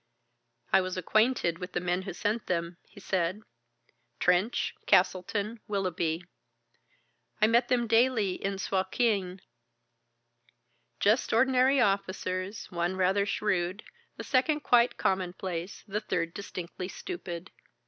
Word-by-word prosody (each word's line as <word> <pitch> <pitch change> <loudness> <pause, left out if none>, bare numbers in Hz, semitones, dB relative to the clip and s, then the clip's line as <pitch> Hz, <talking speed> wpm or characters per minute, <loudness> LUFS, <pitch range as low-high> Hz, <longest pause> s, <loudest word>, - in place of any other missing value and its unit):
"I 190 - +7
was 185 0 -4
acquainted 200 -3 +2
with 180 0 -7
the - - 0
men 180 +1 -1
who 190 -1 -6
sent 215 +5 -2
them," 170 -1 -2
he - - -15
said, 190 +1 -1 0.8
"Trench, 180 +6 +2
Castleton, 200 +4 +2
Willoughby. 180 -4 -1 1.1
I 215 - +5
met 235 +2 +3
them 245 -1 +2
daily 225 -4 +2
in 195 0 -1
Suakin, 190 -1 0 1.6
just 215 +5 +2
ordinary 260 +3 +4
officers, 195 -2 -1
one 175 +1 -1
rather 190 +2 +2
shrewd, 195 -1 -1 0.3
the - - -5
second 295 +3 +2
quite 245 -3 +4
commonplace, 185 -1 -2
the 210 +1 -2
third 170 -5 -2
distinctly 185 -2 -6
stupid. 185 - -7
195 Hz, 115 wpm, -29 LUFS, 180-220 Hz, 1.6 s, I